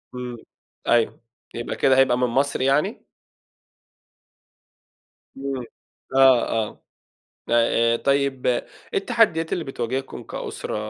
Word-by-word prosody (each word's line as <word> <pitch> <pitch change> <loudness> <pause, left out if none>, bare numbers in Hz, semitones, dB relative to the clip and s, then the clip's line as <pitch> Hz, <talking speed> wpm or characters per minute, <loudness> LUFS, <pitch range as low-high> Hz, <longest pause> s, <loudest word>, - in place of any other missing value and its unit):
امم، 125 -1 -5 0.5
أيوه، 120 -1 +2 0.3
يبقى 120 - -4
كده 130 -1 +3
هيبقى 130 -2 +4
من 125 0 +2
مصر 135 +4 0
يعني؟ 135 +3 +1 2.3
امم، 135 -2 -4 0.5
آه، 135 -2 +6
آه. 110 -2 -2 0.7
آآ، 115 0 +3
آآ - - +2
طيِّب 140 0 0
إيه 125 -1 +1 0.3
التَّحدِّيات 180 -6 +2
اللي 170 - -1
بتواجهكم 130 0 -4
كأسرة، - - -5
130 Hz, 105 wpm, -23 LUFS, 120-140 Hz, 2.3 s, آه